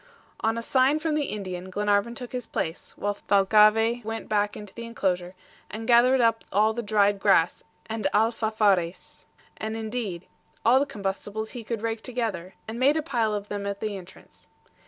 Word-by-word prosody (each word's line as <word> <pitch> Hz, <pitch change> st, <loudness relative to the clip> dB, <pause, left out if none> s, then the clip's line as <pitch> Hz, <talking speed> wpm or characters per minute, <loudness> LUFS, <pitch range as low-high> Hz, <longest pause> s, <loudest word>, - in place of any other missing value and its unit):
On 225 Hz, +1 st, 0 dB
a 230 Hz, -, -3 dB
sign 265 Hz, +4 st, +3 dB
from 310 Hz, 0 st, -1 dB
the 300 Hz, -1 st, +1 dB
Indian 185 Hz, -3 st, -5 dB
Glenarvan 205 Hz, +4 st, +1 dB
took 245 Hz, -2 st, -7 dB
his 250 Hz, -2 st, -5 dB
place, 160 Hz, +2 st, -4 dB
while 205 Hz, 0 st, -1 dB
Thalcave 215 Hz, +4 st, +4 dB
went 225 Hz, +1 st, -5 dB
back 205 Hz, -1 st, 0 dB
into 210 Hz, -2 st, -10 dB
the 235 Hz, -, -7 dB
inclosure 185 Hz, -6 st, -2 dB, 0.3 s
and 225 Hz, +1 st, -6 dB
gathered 250 Hz, +2 st, +5 dB
up 230 Hz, -1 st, +2 dB
all 215 Hz, +3 st, +3 dB
the 235 Hz, -, -3 dB
dried 205 Hz, -2 st, +2 dB
grass 195 Hz, -4 st, +3 dB, 0.2 s
and 220 Hz, -2 st, -2 dB
ALFAFARES, 215 Hz, -5 st, +1 dB, 0.3 s
and, 220 Hz, +1 st, -4 dB
indeed, 220 Hz, -6 st, -4 dB, 0.4 s
all 245 Hz, +3 st, +6 dB
the 285 Hz, -, 0 dB
combustibles 205 Hz, +2 st, -4 dB
he 240 Hz, -, -7 dB
could 225 Hz, -1 st, -4 dB
rake 225 Hz, -1 st, -2 dB
together, 220 Hz, -8 st, -4 dB
and 225 Hz, +2 st, -5 dB
made 280 Hz, +4 st, +4 dB
a 315 Hz, -, -1 dB
pile 230 Hz, -6 st, 0 dB
of 205 Hz, 0 st, -5 dB
them 205 Hz, -1 st, -4 dB
at 200 Hz, 0 st, -3 dB
the 215 Hz, -2 st, -3 dB
entrance. 185 Hz, -2 st, -13 dB
215 Hz, 175 wpm, -26 LUFS, 200-235 Hz, 0.4 s, all